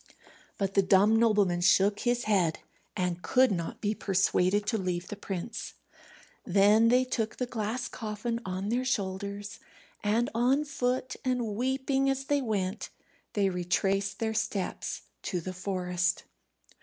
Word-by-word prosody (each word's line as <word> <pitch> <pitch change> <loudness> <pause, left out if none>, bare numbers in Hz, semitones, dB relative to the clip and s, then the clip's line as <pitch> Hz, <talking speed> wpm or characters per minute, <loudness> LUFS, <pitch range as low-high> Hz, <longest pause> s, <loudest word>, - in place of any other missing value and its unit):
But 195 -1 -1
the 195 - +5
dumb 195 +3 +4
nobleman 205 -6 +3
shook 195 +3 +4
his 240 0 0
head, 185 -7 +2 0.4
and 180 -1 -1
could 255 +4 +3
not 170 -4 -3
be 210 0 0
persuaded 195 0 +1
to 220 +1 0
leave 180 -1 -3
the - - -4
prince. 195 +1 -5 0.7
Then 205 +4 +5
they 250 +2 +4
took 225 -3 -2
the 250 - -1
glass 240 +1 -3
coffin 225 +2 -4
on 190 +2 -3
their 245 +3 +1
shoulders, 200 -3 -3 0.4
and 220 +4 +2
on 255 +6 +2
foot, 255 -2 -2
and 245 -5 -1
weeping 265 +3 0
as 270 0 -1
they 285 0 +1
went, 205 -4 -2 0.4
they 200 -2 +2
retraced 195 +2 0
their 220 -1 -1
steps 210 -3 -3 0.2
to 180 - -2
the 185 +2 -6
forest. 180 -1 -1
205 Hz, 145 wpm, -29 LUFS, 190-240 Hz, 0.7 s, the